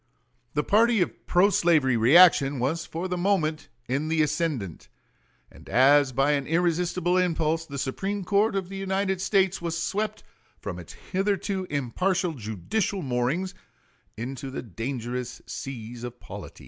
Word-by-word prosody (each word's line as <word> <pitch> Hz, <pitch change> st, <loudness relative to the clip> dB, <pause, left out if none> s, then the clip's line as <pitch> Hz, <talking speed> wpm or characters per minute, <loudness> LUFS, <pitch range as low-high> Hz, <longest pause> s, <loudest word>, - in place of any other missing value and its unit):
The 150 Hz, -, +1 dB
party 230 Hz, +4 st, +4 dB
of -, -, -9 dB
pro 185 Hz, +3 st, +4 dB
slavery 155 Hz, -9 st, +3 dB
reaction 140 Hz, +3 st, +6 dB
was 140 Hz, +7 st, -1 dB
for 170 Hz, +3 st, -4 dB
the 180 Hz, -1 st, -3 dB
moment 165 Hz, -5 st, 0 dB, 0.2 s
in 140 Hz, +5 st, -1 dB
the 160 Hz, -1 st, +2 dB
ascendant; 150 Hz, -, -2 dB, 0.6 s
and -, -, -15 dB
as 135 Hz, +2 st, +5 dB
by 135 Hz, +4 st, +2 dB
an 140 Hz, -2 st, 0 dB
irresistible 175 Hz, +2 st, +1 dB
impulse, 165 Hz, -2 st, 0 dB
the 140 Hz, -, -6 dB
Supreme 195 Hz, +10 st, -3 dB
Court 205 Hz, +3 st, +2 dB
of 190 Hz, -2 st, -2 dB
the 195 Hz, -, -6 dB
United 190 Hz, -1 st, -1 dB
States 195 Hz, -2 st, +2 dB
was 170 Hz, -1 st, -2 dB
swept 210 Hz, +5 st, -2 dB, 0.4 s
from -, -, -6 dB
its -, -, -10 dB
hitherto 195 Hz, 0 st, -2 dB
impartial 175 Hz, +7 st, 0 dB
judicial 145 Hz, -, -2 dB
moorings 135 Hz, +9 st, -1 dB, 0.6 s
into 130 Hz, +3 st, -5 dB
the 130 Hz, -, -5 dB
dangerous 120 Hz, +3 st, -5 dB
seas 120 Hz, -2 st, -7 dB
of 120 Hz, 0 st, -7 dB
polities. -, -, -10 dB
165 Hz, 145 wpm, -26 LUFS, 135-190 Hz, 0.6 s, reaction